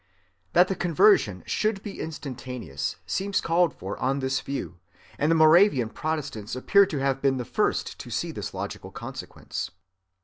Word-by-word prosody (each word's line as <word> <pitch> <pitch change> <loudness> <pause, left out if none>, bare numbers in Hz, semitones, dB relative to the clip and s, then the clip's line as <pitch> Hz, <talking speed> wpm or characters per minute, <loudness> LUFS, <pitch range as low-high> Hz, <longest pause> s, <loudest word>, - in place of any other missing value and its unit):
That 180 +2 +6
the 195 - 0
conversion 175 - +3
should 215 -2 -1
be 205 - -7
instantaneous 125 - -5
seems 195 0 0
called 170 0 +2
for 95 -4 -7
on 135 +2 +1
this 130 -1 -1
view, 135 -10 -5 0.4
and 150 - +2
the 165 - +4
Moravian 155 - +5
Protestants 135 -8 -4
appear 200 +10 +4
to 155 - -3
have 135 0 0
been 135 -1 +2
the 125 - -3
first - - -1
to - - -8
see - - -2
this - - -5
logical - - -6
consequence. - - -6
145 Hz, 160 wpm, -26 LUFS, 130-175 Hz, 0.4 s, That